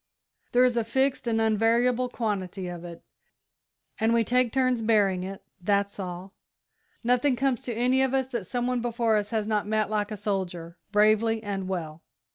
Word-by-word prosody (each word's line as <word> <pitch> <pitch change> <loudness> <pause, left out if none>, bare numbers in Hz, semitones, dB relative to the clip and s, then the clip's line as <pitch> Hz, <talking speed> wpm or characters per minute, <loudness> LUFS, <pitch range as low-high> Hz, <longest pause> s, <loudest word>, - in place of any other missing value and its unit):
There 250 +1 +6
is 245 -1 +1
a 230 - +2
fixed 265 +3 0
and 225 -1 +1
unvariable 230 +3 +2
quantity 195 -5 -3
of 175 -1 -7
it, 170 -1 -10 1.0
and 225 +1 +3
we 230 - +3
take 250 +1 +2
turns 255 -2 +1
bearing 205 -5 +2
it 195 +1 -7 0.2
that's 200 +2 0
all. 185 +1 -6 0.7
Nothing 250 +3 +2
comes 260 -1 0
to 245 - -4
any 250 +3 +2
of 265 0 +1
us 265 -1 +1
that 235 -8 -4
some 245 -1 -2
one 250 -1 0
before 235 -1 +1
us 205 0 -2
has 220 -2 -1
not 210 -1 -1
met 215 0 0
like 210 -1 0
a 215 - -5
soldier, 180 -4 -3 0.2
bravely 215 +2 +3
and 195 -2 -3
well." 165 -4 -4
220 Hz, 180 wpm, -27 LUFS, 195-245 Hz, 1.0 s, There